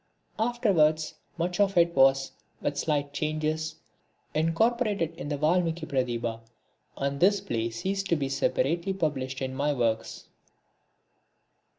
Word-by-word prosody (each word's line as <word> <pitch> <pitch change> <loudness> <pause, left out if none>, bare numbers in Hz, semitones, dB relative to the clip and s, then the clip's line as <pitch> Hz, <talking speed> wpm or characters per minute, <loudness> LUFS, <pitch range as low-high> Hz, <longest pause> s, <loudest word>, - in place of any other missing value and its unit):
Afterwards, 190 -10 +2 0.2
much 175 +2 -2
of 195 -2 +2
it 170 0 +5
was, 135 0 +4 0.3
with 145 - -2
slight 145 -1 -1
changes, 155 +1 -1 0.6
incorporated 185 +3 +1
in 165 -3 -6
the 145 - -1
Valmiki 165 +1 +1
Pratibha, 120 -5 -1 0.6
and 140 0 -2
this 200 +3 +4
play 115 -6 -2
ceased 195 +12 -2
to 170 - +3
be 140 -3 -1
separately 170 +6 0
published 135 -7 -2
in 130 0 -3
my 145 +2 0
works. 115 -4 -1
155 Hz, 120 wpm, -28 LUFS, 135-175 Hz, 0.6 s, it